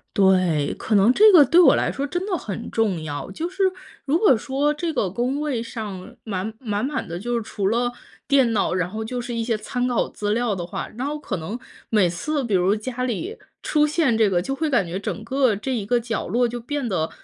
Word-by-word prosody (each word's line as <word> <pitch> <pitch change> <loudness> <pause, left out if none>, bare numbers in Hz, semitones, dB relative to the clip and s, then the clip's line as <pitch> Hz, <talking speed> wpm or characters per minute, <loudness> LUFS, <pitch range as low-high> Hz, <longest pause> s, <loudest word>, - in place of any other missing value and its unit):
对， 185 -6 +3
可 215 - -1
能 205 +6 +5
这 430 +5 +7
个 310 -6 +8
对 345 +8 +6
我 - - +7
来 - - 0
说 280 - -3
真 350 +6 -3
的 395 -3 -1
很 215 -2 -6
重 205 -7 0
要， 145 +2 -5
就 320 - -3
是 380 +2 -2 0.4
如 295 +4 +2
果 355 - +5
说 280 +5 0
这 325 +2 -2
个 210 -10 0
工 250 +8 -1
位 280 -6 -1
上 220 -1 -7
满 200 0 -3
满 210 -3 -2
满 290 -7 -3
的， 170 +1 -5
就 240 +3 -2
是 230 - 0
除 200 -3 -2
了 240 +3 +1 0.4
电 270 -5 +4
脑， 200 - +1
然 180 -1 0
后 220 +2 -5
就 245 +1 -3
是 240 0 -5
一 230 - -1
些 230 -1 0
参 245 +3 -2
考 245 - 0
资 205 0 -3
料 235 -3 0
的 175 -2 -4
话， - - -5
然 255 - -2
后 300 +1 -2
可 195 - -4
能 185 +9 -5 0.3
每 205 -6 +3
次 280 - -2
比 215 -5 0
如 185 +3 +3
家 250 +3 -4
里 255 - -3 0.2
出 300 0 +2
现 300 -7 +1
这 215 -3 +4
个， 175 -2 +1
就 270 +8 -3
会 315 +2 -1
感 240 -9 +2
觉 175 +3 -4
整 200 +1 -4
个 255 -2 +2
这 260 +6 -3
一 210 -4 -3
个 240 +3 +2
角 230 -2 -3
落 240 +6 +2
就 240 +1 -5
变 260 0 -3
得 160 -4 -1
235 Hz, 260 characters per minute, -23 LUFS, 200-270 Hz, 0.4 s, 个